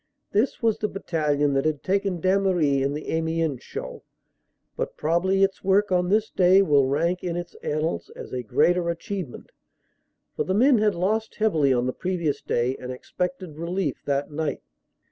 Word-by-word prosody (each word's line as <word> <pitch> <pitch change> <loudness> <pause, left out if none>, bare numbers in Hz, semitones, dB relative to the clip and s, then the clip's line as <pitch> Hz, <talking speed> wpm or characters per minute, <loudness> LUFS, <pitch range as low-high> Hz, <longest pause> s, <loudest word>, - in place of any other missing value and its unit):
This 230 +4 0
was 225 -2 +2
the 210 - 0
battalion 150 -7 0
that 135 0 +1
had 155 -2 -1
taken 195 -1 0
Damery 185 -6 +2
in 140 +2 0
the 150 - -5
Amiens 160 -4 -1
show, - - -7 0.7
but - - -4
probably 185 +5 +2
its 195 0 0
work 195 +1 +3
on 180 -1 +2
this 215 +2 +2
day 185 +1 +5
will 145 -6 +3
rank 170 +6 0
in 175 -2 -2
its 175 0 -5
annals 155 +2 -2
as - - -9
a 125 - -2
greater 170 - +2
achievement, 170 -3 -5 0.8
for - - 0
the 185 - -1
men 250 +2 +5
had 210 -2 +2
lost 215 +5 -1
heavily 160 -11 +2
on 125 -1 +2
the 130 - -1
previous 175 -5 -2
day 125 +2 0
and 125 - -7
expected 180 +4 -5
relief 170 -2 -2
that 140 +1 -1
night. 150 -1 -3
170 Hz, 170 wpm, -25 LUFS, 145-195 Hz, 0.8 s, day